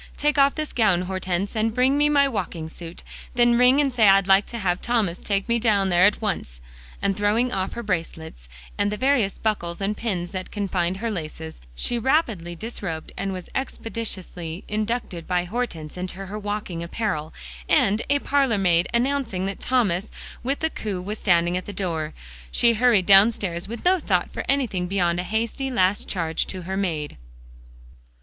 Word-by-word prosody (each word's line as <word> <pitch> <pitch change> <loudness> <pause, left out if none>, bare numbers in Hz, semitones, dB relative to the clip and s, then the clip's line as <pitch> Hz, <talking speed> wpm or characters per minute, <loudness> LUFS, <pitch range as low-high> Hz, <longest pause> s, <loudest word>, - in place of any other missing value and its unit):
Take 295 0 +1
off 275 0 +5
this 310 -1 -4
gown, 200 -7 +3
Hortense, 185 +2 -2
and 220 0 0
bring 255 +2 +3 0.2
my 280 -1 +5
walking 170 -10 -4
suit, 165 +1 -9 0.3
then 240 0 +4
ring 250 +3 +5
and 280 -3 +2
say 225 -4 +5
I'd 195 0 +6
like 195 +1 +4
to 235 - -5
have 180 -4 0
Thomas 220 -8 0
take 200 0 -1
me 235 0 +2
down 205 -4 +2
there 175 0 +5
at 210 - 0
once," 185 - -3 0.4
and 195 -1 +1
throwing 215 +5 +1
off 190 0 -2
her 235 - -5
bracelets, 160 - -4 0.3
and 205 0 +2
the 210 - -3
various 250 -5 +2
buckles 175 -6 -2
and 200 +1 -1
pins 185 -6 -3
that 185 -1 -5
confined 190 -3 -1
her 230 +3 -2
laces, 160 -3 -6
she 240 - -1
rapidly 225 - 0
disrobed 175 -5 -6
and 195 0 -3
was 185 -2 -6
expeditiously 195 -9 -5
inducted 215 -5 -3
by 180 -1 +1
Hortense 175 -7 -4
into 185 +1 -5
her 205 +3 -6
walking 205 -4 -4
apparel, 170 -4 -3 0.4
and, 210 +3 +3
a 285 - +4
parlor 275 -5 +1
maid 175 -3 +3
announcing 240 -7 0
that 195 0 -4
Thomas 215 -6 +1 0.3
with 270 +3 -2
the 320 0 0
coupe 190 -4 -4
was 210 +1 -6
at 175 0 +3
the 205 - -6
door, 165 -5 -3 0.4
she 235 -1 +4
hurried 230 -4 +4
downstairs, 195 -3 +4
with 235 +7 -7
no 370 +1 +4
thought 185 - 0
for - - -3
anything 235 -10 0
beyond 175 -2 +1
a - - -1
hasty 230 +7 -2
last 195 -5 +1
charge 165 -4 -1
to 185 -2 -6
her 190 +2 -4
maid. 160 - -2
200 Hz, 175 wpm, -24 LUFS, 180-235 Hz, 0.4 s, I'd